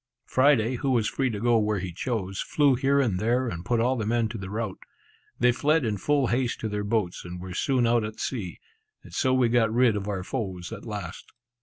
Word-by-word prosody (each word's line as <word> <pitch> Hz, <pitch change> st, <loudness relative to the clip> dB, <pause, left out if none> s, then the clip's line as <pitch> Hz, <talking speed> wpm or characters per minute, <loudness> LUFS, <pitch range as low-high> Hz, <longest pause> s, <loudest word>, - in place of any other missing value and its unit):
Friday, 130 Hz, -3 st, +3 dB
who 135 Hz, -, -1 dB
was 120 Hz, -5 st, +2 dB
free 135 Hz, +3 st, 0 dB
to 105 Hz, -3 st, -4 dB
go 120 Hz, +1 st, +3 dB
where 105 Hz, -1 st, 0 dB
he 90 Hz, -2 st, -5 dB
chose, 95 Hz, -2 st, -3 dB
flew 145 Hz, -3 st, +3 dB
here 135 Hz, +2 st, +2 dB
and 110 Hz, -9 st, +1 dB
there, 120 Hz, +4 st, +1 dB
and 85 Hz, -5 st, -5 dB
put 120 Hz, +5 st, 0 dB
all 125 Hz, +3 st, +2 dB
the 115 Hz, -, -2 dB
men 115 Hz, 0 st, +1 dB
to 110 Hz, -1 st, -6 dB
the 95 Hz, -1 st, -6 dB
rout. 105 Hz, -2 st, -4 dB, 0.6 s
They 125 Hz, +1 st, +5 dB
fled 150 Hz, +3 st, +2 dB
in 105 Hz, -2 st, -1 dB
full 145 Hz, +6 st, +1 dB
haste 120 Hz, 0 st, 0 dB
to 110 Hz, -, -2 dB
their 105 Hz, 0 st, -2 dB
boats, 100 Hz, -4 st, -1 dB
and 90 Hz, 0 st, -7 dB
were 90 Hz, 0 st, -7 dB
soon 125 Hz, +5 st, +1 dB
out 115 Hz, -1 st, +3 dB
at 105 Hz, 0 st, -6 dB
sea; 105 Hz, -9 st, -4 dB, 0.4 s
and -, -, -14 dB
so 130 Hz, -, +1 dB
we 130 Hz, -2 st, +3 dB
got 115 Hz, -2 st, +2 dB
rid 120 Hz, -1 st, +3 dB
of 100 Hz, -1 st, -3 dB
our 100 Hz, -3 st, -2 dB
foes 95 Hz, -7 st, -4 dB
at -, -, -9 dB
last. 105 Hz, -3 st, -7 dB
115 Hz, 230 wpm, -26 LUFS, 100-130 Hz, 0.6 s, They